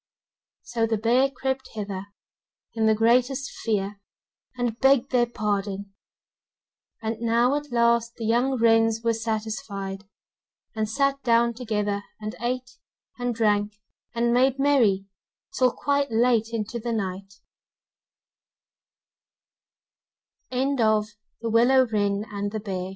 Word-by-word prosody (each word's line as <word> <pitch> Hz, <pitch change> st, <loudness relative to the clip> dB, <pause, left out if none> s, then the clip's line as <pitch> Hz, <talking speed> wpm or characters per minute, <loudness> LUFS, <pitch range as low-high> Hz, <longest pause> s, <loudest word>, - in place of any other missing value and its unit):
So 230 Hz, -1 st, -1 dB
the 225 Hz, -1 st, 0 dB
bear 245 Hz, +5 st, +3 dB
crept 265 Hz, 0 st, -3 dB
thither 200 Hz, -2 st, -5 dB, 0.7 s
in 225 Hz, -1 st, +1 dB
the 220 Hz, -, +4 dB
greatest 250 Hz, +5 st, +2 dB
fear, 205 Hz, -2 st, -1 dB, 0.6 s
and 240 Hz, -2 st, -2 dB
begged 270 Hz, -1 st, +3 dB
their 245 Hz, -2 st, +3 dB
pardon. 200 Hz, -3 st, -3 dB, 1.1 s
And 220 Hz, 0 st, -2 dB
now 235 Hz, +3 st, +2 dB
at 295 Hz, -1 st, -4 dB
last 235 Hz, -1 st, +2 dB
the 230 Hz, -, -5 dB
young 245 Hz, +4 st, +2 dB
wrens 225 Hz, -1 st, +3 dB
were 230 Hz, 0 st, +2 dB
satisfied, 215 Hz, -3 st, -4 dB, 0.7 s
and 215 Hz, -1 st, -1 dB
sat 275 Hz, +3 st, +1 dB
down 235 Hz, -1 st, +3 dB
together 210 Hz, -4 st, -2 dB, 0.2 s
and 215 Hz, 0 st, -5 dB
ate 250 Hz, +1 st, -3 dB, 0.4 s
and 245 Hz, -1 st, -1 dB
drank, 210 Hz, -2 st, +1 dB, 0.4 s
and 235 Hz, 0 st, +2 dB
made 260 Hz, +2 st, +3 dB
merry 245 Hz, -9 st, +3 dB, 0.5 s
till 255 Hz, -1 st, +3 dB
quite 285 Hz, +1 st, 0 dB
late 230 Hz, -1 st, +2 dB
into 225 Hz, +1 st, -3 dB
the 235 Hz, +1 st, -3 dB
nigh 195 Hz, -2 st, -3 dB
230 Hz, 100 wpm, -25 LUFS, 215-250 Hz, 1.1 s, the